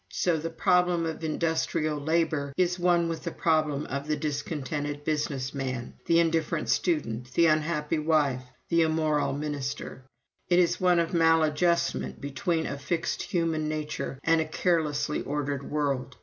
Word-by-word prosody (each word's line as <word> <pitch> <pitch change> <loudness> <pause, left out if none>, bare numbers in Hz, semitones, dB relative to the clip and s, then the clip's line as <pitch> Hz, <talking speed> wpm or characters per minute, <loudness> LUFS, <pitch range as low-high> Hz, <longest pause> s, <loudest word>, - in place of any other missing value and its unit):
So 175 -2 +1
the 160 +2 -3
problem 180 0 +2
of 160 0 -4
industrial 155 -1 0
labor 155 -2 0
is 180 0 +1
one 175 -1 +3
with 165 -1 -3
the 170 - -2
problem 155 -3 +1
of 140 +2 -4
the 155 - +1
discontented 145 -1 -3
business 145 -3 -2
man, 130 -3 -4
the 170 0 +5
indifferent 165 -1 0
student, 125 -8 0
the 170 - +4
unhappy 155 0 +1
wife, 150 -5 +2 0.3
the 170 0 +3
immoral 155 -2 +1
minister 140 -2 -4 0.5
it 175 - +4
is 180 0 +2
one 180 -1 +4
of 170 0 0
maladjustment 165 +1 +2
between 150 +4 -1
a 140 - -4
fixed 165 +3 -2
human 165 -3 -1
nature 150 -3 -4
and 165 0 +3
a - - -1
carelessly 155 -3 0
ordered 140 -1 -3
world. 140 -3 -1
155 Hz, 150 wpm, -27 LUFS, 145-165 Hz, 0.5 s, the